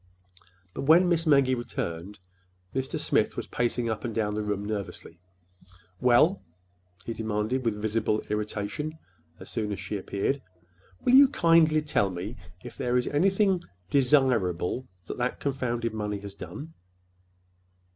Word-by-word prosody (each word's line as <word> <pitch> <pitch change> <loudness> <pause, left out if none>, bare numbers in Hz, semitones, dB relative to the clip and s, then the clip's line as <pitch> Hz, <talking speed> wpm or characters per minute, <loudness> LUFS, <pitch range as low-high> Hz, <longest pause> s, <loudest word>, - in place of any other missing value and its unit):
But - - -4
when 170 +5 +6
Miss 165 -1 +1
Maggie 140 -3 +5
returned, 100 -6 -4 0.5
Mr. 130 0 -2
Smith - - +1
was - - -3
pacing 120 0 -1
up 110 -2 -3
and 115 -3 -4
down 105 -2 0
the 105 - -1
room 105 -1 -2
nervously. 100 -5 -5 0.8
"Well," 125 +10 +4 0.6
he 115 - -3
demanded 110 +3 -1
with 110 -3 -1
visible 110 0 0
irritation, 105 +9 -3 0.4
as - - -9
soon 110 -3 -2
as 100 - -4
she 100 +2 -4
appeared, 100 +9 -1 0.6
"will 250 - +4
you 275 +1 +9
kindly 165 - +4
tell 105 -9 +1
me 95 +6 -5 0.3
if - - -9
there 125 0 +1
is 125 - +1
anything—desirable—that 130 - +1
that 125 +1 -1
confounded 120 -4 -2
money 105 -1 -3
has 100 -1 -8
done?" 150 +10 -9
120 Hz, 135 wpm, -27 LUFS, 105-145 Hz, 0.8 s, you